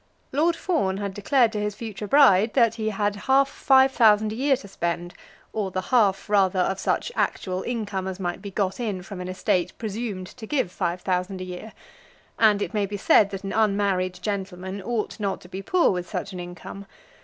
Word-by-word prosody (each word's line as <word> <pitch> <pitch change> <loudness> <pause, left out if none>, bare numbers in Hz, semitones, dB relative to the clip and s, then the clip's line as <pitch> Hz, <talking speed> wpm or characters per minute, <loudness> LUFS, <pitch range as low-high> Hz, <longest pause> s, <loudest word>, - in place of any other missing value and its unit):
Lord 325 +5 +2
Fawn 255 - 0
had 200 -1 -4
declared 230 +4 +2
to 215 - -3
his 210 -1 -2
future 210 -2 -6
bride 220 -6 +5
that 230 -4 +4
he 220 -1 -2
had 205 0 -1
half 270 +1 +5
five 265 -1 +4
thousand 215 -4 +4
a - - -5
year 270 +2 +2
to 210 - -12
spend, 175 -1 -3 0.4
or 205 -3 -1
the 185 - -3
half, 200 -6 +3
rather, 195 -2 +3
of 190 +1 0
such - - -1
actual 185 -1 -1
income 205 -5 -3
as 190 0 -5
might 175 -2 -3
be 200 - -6
got 195 0 -2
in 205 -6 -3
from 195 -1 -8
an 180 - -5
estate 185 -1 0
presumed 215 -3 -4
to 220 +4 -11
give 260 -10 0
five 180 -1 -2
thousand 185 +1 -1
a - - -4
year, 185 +4 -8 0.7
and 210 -2 +4
it - - -6
may 205 -2 0
be 205 +1 -5
said 200 +1 +4
that 195 -1 -6
an 195 - -4
unmarried 200 -4 +1
gentleman 190 -1 -4
ought 225 +2 -3
not 200 -2 -2
to - - -13
be 190 +2 -6
poor 360 - +3
with 180 -2 -4
such 200 - -4
an 180 - -6
income. 175 +3 -9
200 Hz, 205 wpm, -24 LUFS, 185-220 Hz, 0.7 s, bride